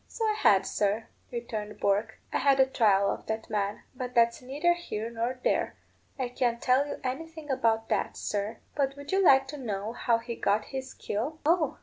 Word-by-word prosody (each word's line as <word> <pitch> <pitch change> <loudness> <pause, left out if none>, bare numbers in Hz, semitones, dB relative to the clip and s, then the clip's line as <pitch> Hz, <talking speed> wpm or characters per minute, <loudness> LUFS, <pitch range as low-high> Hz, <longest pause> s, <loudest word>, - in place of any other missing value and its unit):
"So 450 - -3
I 430 - +3
had, 195 - +4
sir," 210 +3 0 0.2
returned 215 -3 -5
Bourke. 205 +3 +1 0.2
"I - - +2
had 275 -1 +4
a 265 - +7
trial 205 -6 +3
of - - -6
that 220 0 -4
man. 205 -1 -1
But 250 -1 -6
that's 235 +1 +4
neither 290 +7 +1
here 230 -10 -5
nor 235 +2 -2
there. - - +1 0.4
I 255 -2 -2
can't 240 -1 0
tell 260 +4 +3
you - - -5
anything 305 +3 -4
about 225 -4 +1
that, - - 0
sir. 210 +2 -2 0.2
But 275 -1 0
would 285 0 -8
you 385 0 +3
like 270 -5 +6
to 295 - -5
know 215 -4 -3
how 240 -1 +2
he 235 +1 -5
got 210 0 +1
his 265 0 -4
skill?" 255 +10 -3
"Oh! 325 -2 +2
245 Hz, 200 wpm, -29 LUFS, 220-275 Hz, 0.4 s, a